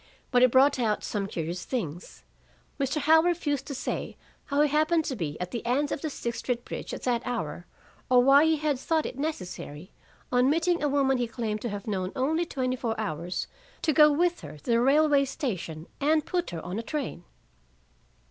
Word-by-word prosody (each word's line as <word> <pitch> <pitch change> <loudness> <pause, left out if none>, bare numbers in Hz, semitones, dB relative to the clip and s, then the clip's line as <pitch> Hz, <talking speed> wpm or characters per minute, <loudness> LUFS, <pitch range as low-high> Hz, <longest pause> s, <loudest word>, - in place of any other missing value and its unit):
But 250 -1 +4
it 255 - +7
brought 270 +2 +4
out 215 -3 0
some 200 -2 -2
curious 170 -1 -4
things. 175 - -5 0.6
Mr. 275 +2 0
Howell 320 +2 +6
refused 310 -5 -1
to 280 - -4
say 260 - -4 0.3
how 285 +1 +1
he 300 - +5
happened 310 +2 +2
to 265 - -2
be 155 -8 -4
at 180 0 -4
the 235 - -4
end 270 +5 0
of - - -2
the 310 - -2
Sixth 235 -4 -4
Street 245 -1 -2
bridge - - -6
at - - -6
that 240 -2 +1
hour, 175 -8 -4 0.4
or 250 -1 +6
why 275 +3 +7
he 320 0 +3
had 300 -3 -1
thought 320 +2 0
it 260 - -6
necessary, 185 - -5 0.4
on 250 +1 +4
meeting 335 +3 +2
a 295 - +1
woman 270 -2 +2
he 240 - 0
claimed 225 -2 -3
to 240 - -3
have 205 -1 -5
known 190 -3 -2
only 315 +6 0
twenty 255 -4 -1
four 230 -3 -3
hours, 175 -3 -3 0.4
to 310 - +2
go 300 +1 +7
with 345 +4 +1
her - - -9
to 145 - -21
the 230 0 +4
railway 285 +2 +4
station 185 - -4
and 305 +2 +2
put 355 -1 -1
her 165 -2 -6
on 185 +5 -3
a - - -1
train. 255 - -4
255 Hz, 205 wpm, -27 LUFS, 215-300 Hz, 0.6 s, it